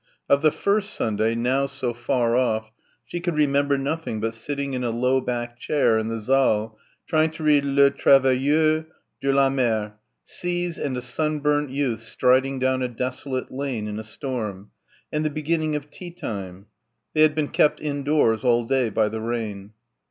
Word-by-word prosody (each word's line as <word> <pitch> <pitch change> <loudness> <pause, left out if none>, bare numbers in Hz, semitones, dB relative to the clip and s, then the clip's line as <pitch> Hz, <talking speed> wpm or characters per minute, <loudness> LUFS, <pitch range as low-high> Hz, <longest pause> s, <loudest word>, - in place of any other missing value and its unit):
Of 140 0 +4
the 155 - +5
first 205 +6 0
Sunday, 110 +1 0
now 130 +4 +1
so 135 -3 -3
far 120 0 0
off, 110 -3 0 0.3
she 175 - -5
could 175 -1 -2
remember 140 -1 +2
nothing 140 -4 -3
but 115 +1 -2
sitting 140 +4 -4
in 125 -1 -2
a 120 - 0
low 125 +3 +1
backed 120 -1 -4
chair 130 -7 +2
in 110 - -2
the 115 0 -3
saal 110 -3 +1 0.3
trying 155 -1 +2
to 160 - -8
read 150 -2 +4
"Les 140 0 +4
Travailleurs 140 +4 +3 0.4
de 140 - +1
la 135 0 +4
Mer"... 110 -6 0 0.3
seas... 175 -1 -2
and 130 -3 -2
a - - -3
sunburnt 150 +2 0
youth 130 -4 -1
striding 130 +4 +2
down 130 0 +1
a 125 - 0
desolate 130 +2 -4
lane 130 -5 -3
in 105 0 -4
a - - -6
storm... 110 -4 -5 0.4
and 150 0 -1
the 155 - +1
beginning 155 +1 -1
of 150 0 -6
tea 180 - -9
time. 100 - -7 0.5
They 155 - +2
had 155 -1 +5
been 155 -2 -1
kept 150 - +2
indoors 145 -6 +1
all 120 -1 +3
day 130 -1 +1
by 110 +1 +1
the 110 +1 -4
rain. 110 -3 -4
130 Hz, 175 wpm, -24 LUFS, 115-150 Hz, 0.5 s, the